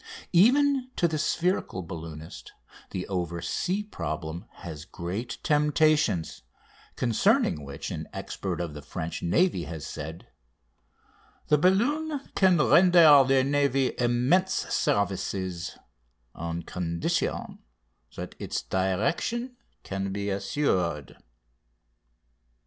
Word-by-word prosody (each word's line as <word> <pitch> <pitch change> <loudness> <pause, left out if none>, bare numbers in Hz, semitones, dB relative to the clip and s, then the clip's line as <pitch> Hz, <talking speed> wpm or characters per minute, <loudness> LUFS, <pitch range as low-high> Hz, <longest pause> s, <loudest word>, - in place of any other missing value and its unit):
Even 260 +7 +4
to 170 - +2
the 155 -2 -2
spherical 170 - 0
balloonist 80 -2 -9 0.4
the 90 -1 -4
oversea 90 - -2
problem 80 - -5 0.2
has 80 -3 -7
great 100 +9 -5
temptations, 150 - +2 0.5
concerning 110 - +2
which 70 0 -6
an - - -5
expert - - -4
of 85 -3 -3
the 75 - -8
French 80 +3 -5
Navy 95 - +2
has 80 -3 -6
said: 80 +2 -7 1.2
"The 150 - +5
balloon 280 - +2
can 185 -2 +4
render 165 -3 +7
the 135 -1 +4
navy 135 -1 +1
immense 125 +10 +2 0.2
services, 95 -3 -1 0.6
on 85 0 -4
condition 85 -1 -2 0.6
that - - -6
its - - -3
direction 105 - -1 0.3
can 95 0 -3
be 100 +1 -2
assured. 90 - -1
100 Hz, 100 wpm, -27 LUFS, -, 1.2 s, render